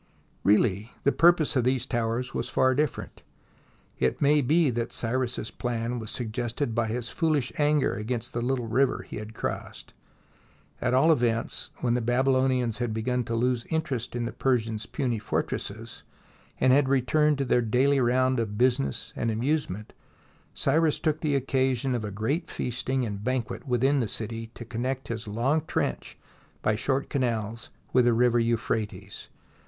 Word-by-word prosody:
Really 105 Hz, +1 st, +2 dB
the 140 Hz, -, +4 dB
purpose 170 Hz, -2 st, +4 dB
of 130 Hz, -, +3 dB
these 130 Hz, 0 st, +1 dB
towers 120 Hz, 0 st, -1 dB
was -, -, -3 dB
far 130 Hz, 0 st, +3 dB
different. 145 Hz, 0 st, -2 dB, 0.8 s
It 65 Hz, -1 st, +1 dB
may 145 Hz, +1 st, +4 dB
be 150 Hz, +2 st, +3 dB
that 115 Hz, 0 st, -2 dB
Cyrus's 120 Hz, -1 st, -2 dB
plan 120 Hz, +1 st, -2 dB
was 110 Hz, -2 st, -6 dB
suggested 120 Hz, +2 st, -3 dB
by 115 Hz, -1 st, +1 dB
his 120 Hz, +2 st, -2 dB
foolish 155 Hz, -6 st, 0 dB
anger 150 Hz, -1 st, +3 dB
against 115 Hz, +2 st, -4 dB
the 120 Hz, -, -1 dB
little 125 Hz, 0 st, -1 dB
river 130 Hz, +4 st, +1 dB
he -, -, -8 dB
had 110 Hz, +1 st, -8 dB
crossed. -, -, -5 dB, 0.9 s
At 125 Hz, +1 st, +1 dB
all 155 Hz, +6 st, +5 dB
events, 120 Hz, -5 st, 0 dB
when 120 Hz, -2 st, +1 dB
the 125 Hz, -, +1 dB
Babylonians 130 Hz, -1 st, +2 dB
had 120 Hz, -3 st, -1 dB
begun 125 Hz, +2 st, 0 dB
to 115 Hz, -, -2 dB
lose 120 Hz, 0 st, +1 dB
interest 135 Hz, -8 st, -2 dB
in 120 Hz, -1 st, -1 dB
the 115 Hz, -, -3 dB
Persians' 115 Hz, -4 st, -1 dB
puny 125 Hz, -6 st, -1 dB
fortresses, 105 Hz, -, -4 dB, 0.6 s
and 130 Hz, -, +5 dB
had 135 Hz, -1 st, +4 dB
returned 145 Hz, +3 st, +3 dB
to 135 Hz, -, -1 dB
their 125 Hz, -1 st, +3 dB
daily 130 Hz, +5 st, +2 dB
round 130 Hz, +1 st, +2 dB
of 105 Hz, -2 st, -2 dB
business 130 Hz, +3 st, 0 dB
and 115 Hz, -, -1 dB
amusement, 115 Hz, -3 st, -1 dB, 0.6 s
Cyrus 160 Hz, -1 st, +2 dB
took 155 Hz, 0 st, -1 dB
the 150 Hz, -3 st, +1 dB
occasion 130 Hz, -1 st, +1 dB
of 120 Hz, -3 st, -2 dB
a 105 Hz, -, -3 dB
great 110 Hz, -, -2 dB
feasting 125 Hz, +1 st, -1 dB
and 100 Hz, -2 st, -5 dB
banquet 125 Hz, +2 st, -2 dB
within 135 Hz, +3 st, +2 dB
the 120 Hz, -, 0 dB
city 115 Hz, +1 st, -4 dB
to 120 Hz, -, -8 dB
connect 125 Hz, +4 st, -3 dB
his 115 Hz, -1 st, -4 dB
long 125 Hz, +9 st, +1 dB
trench -, -, -2 dB, 0.5 s
by 110 Hz, -, +3 dB
short 135 Hz, +5 st, 0 dB
canals 115 Hz, -4 st, -2 dB, 0.2 s
with 125 Hz, -1 st, +5 dB
the 120 Hz, -, +4 dB
river 120 Hz, +1 st, +3 dB
Euphrates. 110 Hz, -3 st, -2 dB
125 Hz, 160 wpm, -27 LUFS, 115-135 Hz, 0.9 s, all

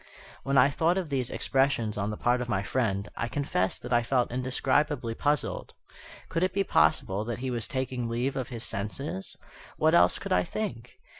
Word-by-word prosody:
When 135 Hz, +1 st, 0 dB
I 140 Hz, -, +6 dB
thought 165 Hz, +5 st, +2 dB
of 180 Hz, -5 st, -2 dB
these 130 Hz, -4 st, -1 dB
expressions 130 Hz, -5 st, +1 dB
on 100 Hz, 0 st, -1 dB
the 105 Hz, -, -4 dB
part 125 Hz, +1 st, +2 dB
of 120 Hz, -, -4 dB
my 95 Hz, -2 st, 0 dB
friend, 100 Hz, -4 st, -1 dB
I 115 Hz, -, -2 dB
confess 110 Hz, -6 st, -1 dB
that -, -, -5 dB
I 120 Hz, -, +5 dB
felt 120 Hz, 0 st, +1 dB
indescribably 130 Hz, 0 st, 0 dB
puzzled. 145 Hz, +3 st, -1 dB, 0.5 s
Could 165 Hz, -, -2 dB
it 185 Hz, -, +1 dB
be 195 Hz, +1 st, +2 dB
possible 95 Hz, -, +2 dB
that 120 Hz, -1 st, -3 dB
he 130 Hz, +1 st, -3 dB
was 120 Hz, -2 st, -2 dB
taking 130 Hz, -2 st, -2 dB
leave 120 Hz, +4 st, -1 dB
of 130 Hz, -2 st, -3 dB
his 120 Hz, -3 st, -5 dB
senses? 100 Hz, 0 st, -5 dB, 0.4 s
What -, -, +3 dB
else -, -, +5 dB
could -, -, -2 dB
I 90 Hz, -, +3 dB
think? 125 Hz, -, -5 dB
125 Hz, 195 wpm, -28 LUFS, 110-140 Hz, 0.5 s, I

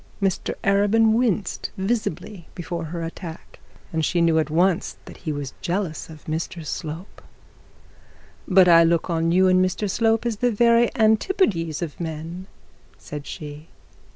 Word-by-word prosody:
Mr 195 Hz, -3 st, -1 dB
Arabin 205 Hz, +3 st, +4 dB
winced 220 Hz, -4 st, 0 dB
visibly 190 Hz, -3 st, -3 dB
before 170 Hz, -1 st, -4 dB
her 165 Hz, +1 st, -5 dB
attack, 165 Hz, 0 st, -8 dB, 0.3 s
and 160 Hz, 0 st, 0 dB
she 175 Hz, +3 st, +1 dB
knew 165 Hz, -1 st, +4 dB
at 155 Hz, -, -1 dB
once 175 Hz, +3 st, +1 dB
that -, -, -11 dB
he 160 Hz, -, -4 dB
was 145 Hz, -2 st, -5 dB
jealous 175 Hz, -3 st, -3 dB
of 155 Hz, -2 st, -13 dB
Mr 160 Hz, +1 st, -4 dB
Slope. 160 Hz, +5 st, -6 dB, 1.3 s
'But 185 Hz, -1 st, +6 dB
I 170 Hz, -1 st, +8 dB
look 170 Hz, +1 st, +1 dB
on 165 Hz, 0 st, +1 dB
you 185 Hz, +2 st, +4 dB
and 185 Hz, 0 st, +4 dB
Mr 185 Hz, +3 st, -1 dB
Slope 225 Hz, +3 st, +1 dB
as 230 Hz, -3 st, -1 dB
the 245 Hz, +3 st, +1 dB
very 235 Hz, +1 st, +4 dB
antipodes 215 Hz, -, +2 dB
of 155 Hz, -4 st, -7 dB
men,' 165 Hz, +3 st, -6 dB, 0.5 s
said 145 Hz, -1 st, -8 dB
she. 150 Hz, +1 st, -8 dB
175 Hz, 150 wpm, -23 LUFS, 160-205 Hz, 1.3 s, I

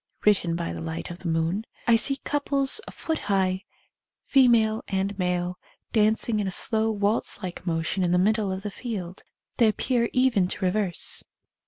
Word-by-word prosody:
(Written 190 Hz, -5 st, +3 dB
by 85 Hz, -, -3 dB
the 85 Hz, -, -6 dB
light 80 Hz, -, -5 dB
of 175 Hz, -, -8 dB
the 180 Hz, -, -5 dB
moon.) 165 Hz, +5 st, 0 dB, 0.2 s
I 235 Hz, -, +5 dB
see 275 Hz, +4 st, +3 dB
couples 280 Hz, +4 st, +1 dB
a -, -, -7 dB
foot 320 Hz, -1 st, -3 dB
high, 190 Hz, 0 st, +1 dB, 0.6 s
fe 270 Hz, -2 st, +5 dB
male 220 Hz, -2 st, +3 dB
and 195 Hz, +1 st, -1 dB
male, 180 Hz, 0 st, -1 dB, 0.3 s
dancing 220 Hz, 0 st, +2 dB
in 200 Hz, -, -1 dB
a -, -, 0 dB
slow 220 Hz, +4 st, +1 dB
waltz 205 Hz, -1 st, 0 dB
like 180 Hz, 0 st, -6 dB
motion 165 Hz, +3 st, -1 dB
in 175 Hz, -, +1 dB
the 180 Hz, -, +3 dB
middle 210 Hz, +1 st, +2 dB
of 190 Hz, +1 st, -4 dB
the 205 Hz, -, -4 dB
field. 190 Hz, -6 st, -6 dB, 0.3 s
They 230 Hz, -, +5 dB
ap 215 Hz, -, 0 dB
pear 240 Hz, -3 st, +1 dB
even 250 Hz, -8 st, +3 dB
to 185 Hz, +1 st, -2 dB
reverse. 185 Hz, -1 st, +1 dB
200 Hz, 185 wpm, -25 LUFS, 180-225 Hz, 0.6 s, I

